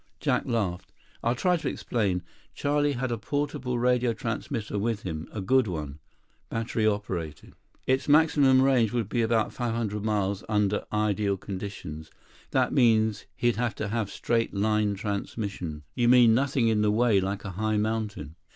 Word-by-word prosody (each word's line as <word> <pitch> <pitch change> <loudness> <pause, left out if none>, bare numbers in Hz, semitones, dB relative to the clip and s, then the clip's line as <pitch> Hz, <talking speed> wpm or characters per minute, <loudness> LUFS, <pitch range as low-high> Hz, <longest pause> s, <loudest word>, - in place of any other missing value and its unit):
Jack - - 0
laughed. 100 -7 -2 0.3
"I'll 120 +1 +1
try 180 +7 +2
to 165 - -2
explain. 95 -7 -1 0.3
Charlie 145 0 +1
had 130 -1 -2
a 115 - -2
portable 130 -1 -2
radio 125 0 +2
transmitter 110 -1 -3
with 110 0 -1
him. 80 -3 -5
A 105 - -5
good 130 +5 +3
one, 75 -5 -5 0.5
battery 115 -1 -1
operated. 90 -8 -3 0.3
Its 130 0 +1
maximum 145 -4 +5
range 125 -5 +3
would 120 -4 0
be 120 +3 0
about 115 -1 +1
500 115 -4 -2
miles 100 -2 0
under 105 -1 +1
ideal 105 -2 0
conditions. 95 -5 -7 0.4
That - - +1
means 110 -4 +3
he'd 120 -2 +1
have 120 -2 -1
to 110 - -3
have 110 -2 -1
straight 115 -1 -1
line 105 0 +1
transmission." 100 -5 -4
"You 120 -1 +2
mean 120 -2 +7
nothing 135 -1 +2
in 110 -2 +2
the 105 - +3
way, 110 -1 +3
like 100 +2 -3
a 95 - -4
high 110 +3 -1
mountain?" 105 -8 -3
110 Hz, 160 wpm, -27 LUFS, 100-120 Hz, 0.5 s, mean